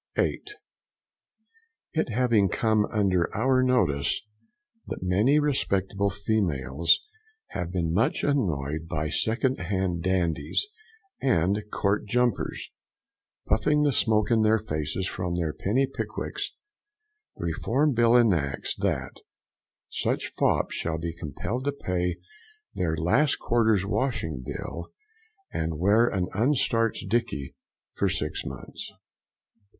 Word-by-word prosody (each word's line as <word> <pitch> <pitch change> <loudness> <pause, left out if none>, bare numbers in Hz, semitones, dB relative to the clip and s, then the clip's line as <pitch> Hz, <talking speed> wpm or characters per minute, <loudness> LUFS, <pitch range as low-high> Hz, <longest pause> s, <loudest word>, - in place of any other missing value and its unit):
8. - - 0 1.4
And 160 - +1
it - - -11
having 115 -4 +3
come 110 +2 +2
under 95 -5 +2
our 130 0 +3
notice, 75 - +2 0.6
that - - -5
many 105 +11 +3
respectable 100 -9 +1
females 85 - +1 0.4
have 90 -2 -4
been 85 -3 -1
much 110 +6 +1
annoyed 80 - 0
by 75 -2 -2
second 125 - 0
hand 90 -2 -1
dandies' 90 - 0 0.6
and 100 -4 +2
counter 100 +1 +1
jumpers 120 +1 0 0.7
puffing 150 +8 +2
the 145 - +3
smoke 110 -3 +2
in 115 -1 +4
their 110 +1 +4
faces 80 -2 -3
from 90 -2 -3
their 85 -3 -1
penny 125 +8 +1
pickwicks, - - -4 0.8
the - - -5
Reform 130 - +1
Bill 120 0 +4
enacts 85 - +1
that - - -2 0.7
such - - -2
fops - - +1
shall 80 -1 -2
be 85 +1 -4
compelled 85 - -4
to 145 - +2
pay 90 -9 -2 0.6
their 80 -3 -1
last 120 - +2
quarter's 110 -5 +2
washing 100 - -1
bill, 85 +6 -6 0.7
and 80 -1 -2
wear 105 +7 +4
an 95 -5 0
unstarched 115 -3 +1
dicky 110 - -1 0.4
for - - +1
six 75 +1 -2
months. 65 -1 -7
100 Hz, 115 wpm, -27 LUFS, 85-120 Hz, 1.4 s, in